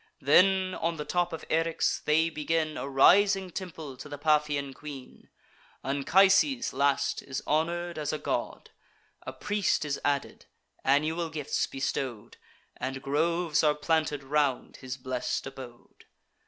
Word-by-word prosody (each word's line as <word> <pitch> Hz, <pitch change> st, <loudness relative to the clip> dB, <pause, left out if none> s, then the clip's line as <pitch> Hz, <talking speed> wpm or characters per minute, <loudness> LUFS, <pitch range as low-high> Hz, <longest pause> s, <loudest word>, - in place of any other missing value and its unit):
Then, 185 Hz, +6 st, +4 dB
on 165 Hz, -2 st, -2 dB
the 150 Hz, -, -5 dB
top 175 Hz, 0 st, 0 dB
of 160 Hz, -, -7 dB
Eryx, 165 Hz, 0 st, 0 dB
they 160 Hz, +2 st, +2 dB
begin 155 Hz, 0 st, -1 dB
A 140 Hz, -, -4 dB
rising 195 Hz, +7 st, +4 dB
temple 165 Hz, -7 st, -7 dB
to 140 Hz, +3 st, -10 dB
the 145 Hz, -, -6 dB
Paphian 150 Hz, -2 st, +1 dB
queen. 140 Hz, -3 st, -11 dB, 0.5 s
Anchises, 195 Hz, -, +3 dB
last, 140 Hz, +1 st, +1 dB
is 130 Hz, -1 st, -6 dB
honour'd 170 Hz, +2 st, -1 dB
as 150 Hz, -1 st, -2 dB
a 155 Hz, -, -2 dB
god; -, -, -4 dB, 0.6 s
A -, -, -3 dB
priest 205 Hz, +5 st, 0 dB
is 140 Hz, -1 st, -2 dB
added, 140 Hz, -1 st, -2 dB, 0.4 s
annual 155 Hz, +5 st, +1 dB
gifts 150 Hz, -3 st, -2 dB
bestow'd, 135 Hz, -4 st, -4 dB, 0.4 s
And 135 Hz, +1 st, -5 dB
groves 160 Hz, +3 st, +1 dB
are 150 Hz, -1 st, +3 dB
planted 150 Hz, -2 st, 0 dB
round 140 Hz, -1 st, 0 dB
his 130 Hz, 0 st, -6 dB
blest 130 Hz, -1 st, -3 dB
abode. 130 Hz, -3 st, -11 dB
150 Hz, 135 wpm, -28 LUFS, 140-165 Hz, 0.6 s, Then